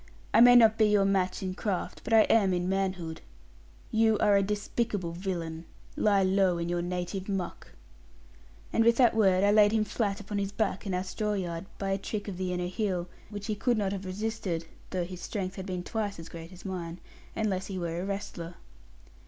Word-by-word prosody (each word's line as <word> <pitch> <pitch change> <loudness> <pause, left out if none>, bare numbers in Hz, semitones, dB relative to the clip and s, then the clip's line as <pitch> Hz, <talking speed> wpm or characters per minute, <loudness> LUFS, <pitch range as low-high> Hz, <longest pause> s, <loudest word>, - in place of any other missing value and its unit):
I 225 - +7
may 245 0 +9
not 225 -2 +6
be 215 - +6
your 205 -1 +4
match 190 -1 +1
in 185 -1 -2
craft; 190 -1 -3
but - - -6
I 225 -1 +8
am 210 -3 +4
in 175 0 -1
manhood. 185 -4 -2 0.7
You 220 -1 +3
are 205 0 +4
a 200 - +5
despicable 205 -2 -2
villain. 170 -2 -4 0.3
Lie 200 -2 +3
low 190 -1 +3
in 170 0 -2
your 175 0 0
native 180 +2 -3
muck.' 195 -3 -4 1.0
And 225 - +4
with 235 0 +4
that 245 -3 +5
word, 190 -3 +4
I 205 - +5
laid 210 0 +6
him 220 -1 +3
flat 205 -1 -1
upon 205 0 -4
his 200 0 -2
back 205 -1 -1
in 190 - -1
our 180 - -1
straw 210 +3 -2
yard, 175 -2 -3
by 195 -1 -2
a 195 - 0
trick 205 +1 -4
of 195 -3 -5
the 185 -1 -2
inner 180 0 -1
heel, 180 -2 -2 0.2
which 205 -1 -6
he 215 - -1
could 240 +3 +1
not 200 -2 0
have 195 -1 -4
resisted 185 -3 -3 0.2
(though 180 -2 -1
his 180 0 -8
strength 190 0 -4
had 190 0 -6
been 180 -1 -3
twice 205 0 -3
as 165 0 -9
great 165 +1 -9
as 185 +1 -13
mine), 175 -2 -5 0.4
unless 195 -3 -1
he 195 - -5
were 170 -1 -3
a - - -3
wrestler. 190 -4 -5
195 Hz, 210 wpm, -29 LUFS, 180-210 Hz, 1.0 s, may